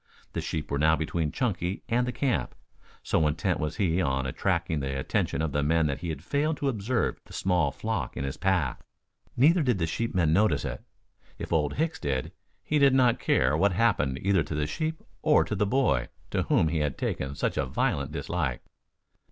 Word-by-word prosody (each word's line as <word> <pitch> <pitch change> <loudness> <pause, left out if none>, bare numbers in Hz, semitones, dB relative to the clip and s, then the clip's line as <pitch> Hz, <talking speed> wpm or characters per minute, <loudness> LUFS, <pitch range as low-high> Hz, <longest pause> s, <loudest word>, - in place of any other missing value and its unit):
The - - -2
sheep 80 - -4
were 70 - 0
now 80 +1 +4
between 80 -1 -2
Chunky 95 -7 -2
and 125 +1 +1
the - - -1
camp. 125 +1 -1 0.5
So 80 - +2
intent 80 +5 0
was 75 -1 -2
he 90 -2 +1
on 65 -4 0
attracting 75 +3 -1
the 70 -1 -3
attention 65 +3 -1
of 80 - -1
the 75 - 0
men 80 +2 +2
that 70 -2 -1
he 85 -2 -3
failed 145 - -1
to 140 - 0
observe 120 0 -1
the - - -14
small 90 -6 +1
flock - - -3
in 65 - -2
his 70 -1 -3
path. - - 0 0.6
Neither 160 +8 +5
did 125 -7 +2
the 85 - 0
sheepmen 85 -3 0
notice 105 +5 +2
it. - - -5 0.6
If - - -5
Old 75 -3 +1
Hicks 160 +2 -1
did, 65 -3 -2 0.3
he 150 - +1
did 140 -2 +5
not 125 -3 +4
care 65 +4 +2
what 100 +4 +3
happened 80 - +2
either 95 0 +3
to 75 - -4
the 75 0 0
sheep 155 - -3 0.2
or 150 -1 +4
to - - -4
the 105 0 +1
boy 100 - +2 0.2
to - - +1
whom 80 - +2
he 80 0 0
had 75 -3 -1
taken 70 +1 -3
such - - -1
a - - 0
violent 70 +2 -1
dislike. 80 -5 -2
85 Hz, 200 wpm, -27 LUFS, 75-115 Hz, 0.6 s, Neither